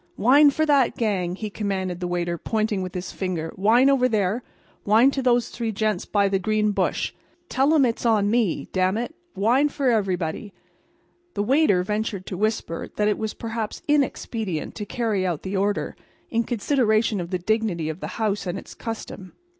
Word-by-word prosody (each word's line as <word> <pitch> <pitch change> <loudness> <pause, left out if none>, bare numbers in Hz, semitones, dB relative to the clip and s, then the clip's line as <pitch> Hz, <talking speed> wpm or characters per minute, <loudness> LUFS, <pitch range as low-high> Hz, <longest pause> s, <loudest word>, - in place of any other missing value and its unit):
"Wine 280 +6 +6
for 315 +3 +1
that 280 -5 +3
gang!" 190 -6 0
he 210 +1 -5
commanded 190 -4 -3
the 180 - -3
waiter, 175 -1 -1
pointing 215 +3 -1
with 185 0 -6
his 180 0 -4
finger. 175 -4 -3
"Wine 225 +7 +4
over 265 -2 +4
there. 210 +1 0 0.4
Wine 225 +6 +5
to 270 - -2
those 245 -2 +2
three 230 -2 -3
gents 215 -2 -1
by 200 -1 +2
that 195 -1 0
green 215 +1 +1
bush. - - -1 0.4
Tell 270 +3 +2
'em 285 -4 +5
it's 230 -2 -2
on 210 -3 +3
me. 230 -7 +1
D––––n 185 +2 +2
it! 240 +6 -3 0.2
Wine 245 +9 +3
for 275 -2 0
everybody!" 195 -3 -1 0.8
The 205 - 0
waiter 255 - +3
ventured 210 -1 -3
to - - -5
whisper 210 -4 -2
that 210 - +1
it 210 - +1
was 220 -1 -3
perhaps 225 -1 -5
inexpedient 230 - -1
to 210 -2 -6
carry 220 -4 -1
out 175 -5 -2
the 190 +1 -4
order, 200 +1 -1 0.4
in 230 0 +1
consideration 220 -3 +1
of 170 - -6
the 185 - -1
dignity 185 -4 -1
of 160 +2 -4
the - - -5
house 210 -3 -1
and 175 +2 -2
its - - -10
custom. 215 -4 -7
215 Hz, 185 wpm, -24 LUFS, 190-235 Hz, 0.8 s, Wine